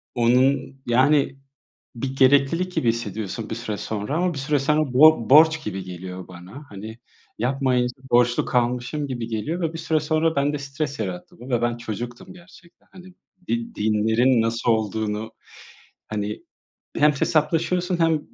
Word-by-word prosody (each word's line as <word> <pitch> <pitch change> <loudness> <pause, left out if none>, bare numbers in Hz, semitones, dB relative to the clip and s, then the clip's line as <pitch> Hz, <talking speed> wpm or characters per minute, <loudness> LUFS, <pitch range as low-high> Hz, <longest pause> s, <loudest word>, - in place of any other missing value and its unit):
Onun 130 +3 +2
yani 135 +3 +3 0.6
bir 130 +3 -4
gereklilik 140 +7 +3
gibi 125 - 0
hissediyorsun 110 -1 -3
bir - - -2
süre 110 -2 -4
sonra. 105 +7 -4
Ama 175 0 0
bir - - -5
süre 145 +2 0
sonra 150 0 +1
bor 135 -3 +5
borç 155 +2 +6
gibi 95 -2 -4
geliyor 90 0 -8
bana. 90 +10 -11
Hani, 110 +3 -9 0.4
yapmayınca 125 0 0 0.2
borçlu 120 0 +3
kalmışım 125 +4 -1
gibi 120 -4 -4
geliyor 115 +11 -3
ve 165 -2 -1
bir 165 - -7
süre 160 -1 0
sonra 155 +1 0
bende 145 +1 +1
stres 140 0 -4
yarattı 95 -5 -5
bu. 125 - -10
Ve 120 -2 +1
ben 120 0 0
çocuktum 120 +1 -7
gerçekten. 175 -1 -19
Hani 185 -1 -14 0.3
di 235 -1 -2
dinlerin 110 +3 +2
nasıl 115 +1 0
olduğunu, 110 0 -1 0.8
hani, 105 0 -4 0.5
hem 150 0 +5
hesaplaşıyorsun 165 +5 0
hem 165 -2 +3
130 Hz, 145 wpm, -23 LUFS, 110-150 Hz, 0.8 s, borç